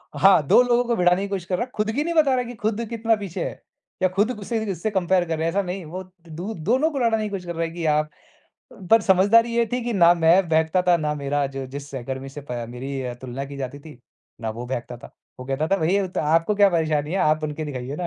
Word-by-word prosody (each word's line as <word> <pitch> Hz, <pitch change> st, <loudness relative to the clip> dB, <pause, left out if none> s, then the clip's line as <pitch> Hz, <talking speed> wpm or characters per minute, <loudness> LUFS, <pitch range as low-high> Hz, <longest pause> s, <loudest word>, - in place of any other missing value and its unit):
हाँ, 195 Hz, -4 st, +6 dB
2 245 Hz, -, +7 dB
लोगों 245 Hz, 0 st, +2 dB
को 235 Hz, 0 st, 0 dB
भिड़ाने 180 Hz, 0 st, +3 dB
की 200 Hz, -, -2 dB
कोशिश 195 Hz, -3 st, -4 dB
कर 180 Hz, 0 st, -1 dB
रहा -, -, 0 dB
है। 250 Hz, -, -23 dB
खुद 215 Hz, 0 st, 0 dB
की 285 Hz, +6 st, -1 dB
नहीं 340 Hz, -, -2 dB
बता 305 Hz, -4 st, +4 dB
रहा 255 Hz, -, +2 dB
है 250 Hz, -, -2 dB
कि 245 Hz, 0 st, -8 dB
खुद 220 Hz, +2 st, -2 dB
कितना 225 Hz, -1 st, +1 dB
पीछे 200 Hz, -5 st, -5 dB
है, -, -, -7 dB, 0.4 s
या -, -, +6 dB
खुद 205 Hz, +6 st, +1 dB
गुस्से 225 Hz, +3 st, -3 dB
भी 205 Hz, -, -2 dB
उससे 185 Hz, +4 st, -3 dB
कंपेयर 185 Hz, -1 st, +2 dB
कर 160 Hz, -1 st, -2 dB
रहे 160 Hz, -, -1 dB
है, 165 Hz, -, +2 dB
ऐसा 200 Hz, +3 st, +1 dB
नहीं, 180 Hz, -1 st, -5 dB
वो 185 Hz, +4 st, -6 dB, 0.3 s
दु 175 Hz, +8 st, -5 dB, 0.2 s
दोनों 265 Hz, +7 st, +3 dB
को 275 Hz, -, -3 dB
लड़ाने 225 Hz, -2 st, +1 dB
की 210 Hz, -, -3 dB
कोशिश 195 Hz, -3 st, -5 dB
कर 170 Hz, -1 st, -5 dB
रहा 165 Hz, -, -1 dB
है 165 Hz, -, -3 dB
कि 165 Hz, -1 st, -5 dB
आप 150 Hz, 0 st, +2 dB, 0.6 s
अ, -, -, -15 dB
पर 225 Hz, -, +7 dB
समझदारी 210 Hz, +5 st, +4 dB
ये 235 Hz, -1 st, +3 dB
थी 250 Hz, -, -1 dB
कि 240 Hz, -, -1 dB
ना 175 Hz, -3 st, +6 dB
मैं 170 Hz, +2 st, +4 dB
बहकता 160 Hz, +3 st, +2 dB
था, 180 Hz, -1 st, +4 dB
ना 150 Hz, -2 st, -2 dB
मेरा 140 Hz, 0 st, -1 dB
जो 135 Hz, -1 st, -6 dB
जिस 140 Hz, +2 st, -8 dB
सहकर्मी 130 Hz, +1 st, -5 dB
से 140 Hz, +2 st, -9 dB
पा 120 Hz, -1 st, -3 dB
मेरी 125 Hz, +1 st, -5 dB
तुलना 130 Hz, +1 st, -5 dB
की 140 Hz, 0 st, -9 dB
जाती 135 Hz, +1 st, -5 dB
थी, 145 Hz, -3 st, -13 dB, 0.4 s
ना 110 Hz, -1 st, -3 dB
वो 120 Hz, +3 st, -7 dB
बहकता 120 Hz, -1 st, -5 dB
था। 120 Hz, -, -13 dB, 0.3 s
वो -, -, -6 dB
कहता 135 Hz, +3 st, -1 dB
था, 195 Hz, -, +3 dB
"भई 170 Hz, +2 st, +1 dB
अ, 200 Hz, -2 st, +1 dB
तो 180 Hz, -, -3 dB
आपको 165 Hz, +6 st, +2 dB
क्या 200 Hz, -1 st, +5 dB
परेशानी 155 Hz, -3 st, 0 dB
है, -, -, 0 dB
आप 155 Hz, -3 st, +2 dB
बन 150 Hz, -, -2 dB
के 155 Hz, -, -4 dB
दिखाइए 135 Hz, -2 st, -5 dB
ना। 175 Hz, -, -2 dB
175 Hz, 280 wpm, -23 LUFS, 145-210 Hz, 0.6 s, 2